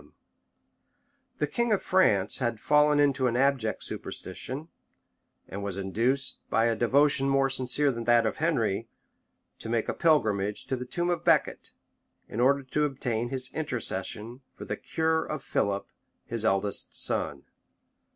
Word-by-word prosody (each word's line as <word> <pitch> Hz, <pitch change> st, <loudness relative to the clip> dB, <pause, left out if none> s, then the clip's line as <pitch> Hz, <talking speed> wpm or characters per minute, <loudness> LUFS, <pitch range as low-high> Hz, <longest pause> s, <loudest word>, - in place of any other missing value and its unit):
] -, -, -46 dB
The -, -, +1 dB
king 235 Hz, -1 st, -1 dB
of 205 Hz, -, +1 dB
France 105 Hz, -, +3 dB
had 120 Hz, -4 st, -1 dB
fallen 150 Hz, +2 st, +4 dB
into 135 Hz, -3 st, +3 dB
an 120 Hz, 0 st, 0 dB
abject 130 Hz, -5 st, +1 dB
superstition; 145 Hz, +6 st, -5 dB, 0.8 s
and 100 Hz, -, -6 dB
was 100 Hz, -2 st, -4 dB
induced, 120 Hz, +8 st, 0 dB
by 115 Hz, -1 st, +2 dB
a 115 Hz, -1 st, +2 dB
devotion 135 Hz, +4 st, +3 dB
more 135 Hz, 0 st, +2 dB
sincere 135 Hz, +2 st, +1 dB
than 115 Hz, -2 st, -5 dB
that 120 Hz, -1 st, +4 dB
of 110 Hz, -, -1 dB
Henry, 115 Hz, -9 st, 0 dB, 0.7 s
to -, -, -2 dB
make 115 Hz, -1 st, 0 dB
a -, -, -1 dB
pilgrimage 110 Hz, -, +1 dB
to 130 Hz, -, -2 dB
the 125 Hz, 0 st, -6 dB
tomb 175 Hz, +6 st, -1 dB
of 175 Hz, -, -2 dB
Becket, -, -, +2 dB, 0.6 s
in 110 Hz, -, -6 dB
order 140 Hz, +3 st, +3 dB
to 150 Hz, +3 st, -1 dB
obtain 120 Hz, -5 st, -1 dB
his 130 Hz, -1 st, -1 dB
intercession 120 Hz, -4 st, -3 dB
for -, -, -9 dB
the -, -, -3 dB
cure 160 Hz, 0 st, 0 dB
of 150 Hz, -3 st, -5 dB
Philip, 100 Hz, 0 st, -1 dB, 0.4 s
his 115 Hz, -1 st, -1 dB
eldest 100 Hz, -1 st, 0 dB
son. -, -, 0 dB
125 Hz, 150 wpm, -28 LUFS, 110-145 Hz, 0.8 s, fallen